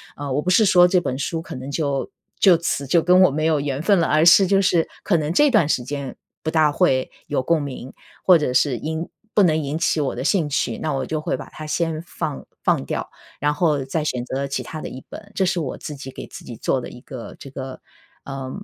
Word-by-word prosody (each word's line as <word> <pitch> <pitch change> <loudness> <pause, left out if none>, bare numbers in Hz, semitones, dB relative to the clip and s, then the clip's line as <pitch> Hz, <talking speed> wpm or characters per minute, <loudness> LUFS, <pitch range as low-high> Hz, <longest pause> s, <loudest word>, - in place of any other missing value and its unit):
呃， 145 -1 -5
我 145 +3 +1
不 180 - -2
是 220 - +5
说 180 -2 +6
这 180 0 +3
本 130 -6 -3
书 160 +3 -2
可 - - -9
能 130 +2 -7
就 140 -3 -1 0.3
就 185 -4 +7
此 150 -4 -2
就 170 +5 +4
跟 180 +2 +5
我 180 - +6
没 155 +2 -1
有 160 -2 +2
缘 140 0 -2
分 195 +4 +3
了， 165 - +2
而 155 +1 +3
是 175 +3 +8
就 195 +1 +3
是 175 -3 +2 0.2
可 175 -5 +2
能 155 +1 -1
这 295 +9 +5
段 205 -11 +4
时 125 - 0
间 140 +1 -5 0.3
不 160 - -1
大 155 -2 +3
会 135 -6 +2 0.2
有 145 -3 0
共 165 +1 +2
鸣， 135 -2 -6 0.3
或 180 -3 +7
者 150 -5 -1
是 130 0 +2
因 160 +7 -3 0.3
不 205 - +5
能 160 -2 +3
引 145 +2 -3
起 165 -1 +1
我 140 - -1
的 125 - -4
兴 170 -1 +2
趣， 120 -4 -1
那 155 -2 -2
我 135 - -2
就 155 - -2
会 150 - -2
把 - - -8
它 155 - -9
先 160 0 -1
放 160 -4 -5 0.2
放 - - +1
掉， - - -4 0.3
然 145 0 +2
后 150 -3 +1
再 135 +5 -2
选 125 -5 -2
择 135 +2 -3
其 140 - -3
他 155 - -7
的 - - -5
一 130 - -9
本， 210 -1 -10
这 190 - +2
是 180 0 0
我 145 -6 -4
自 150 - -7
己 135 -1 -8
给 - - -8
自 - - -11
己 120 - -8
做 130 - 0
的 120 - -7
一 125 - -12
个 130 -3 -9
这 135 - -10
个， 130 -1 -7 0.4
呃， 135 -1 -6
150 Hz, 270 characters per minute, -22 LUFS, 135-170 Hz, 0.4 s, 是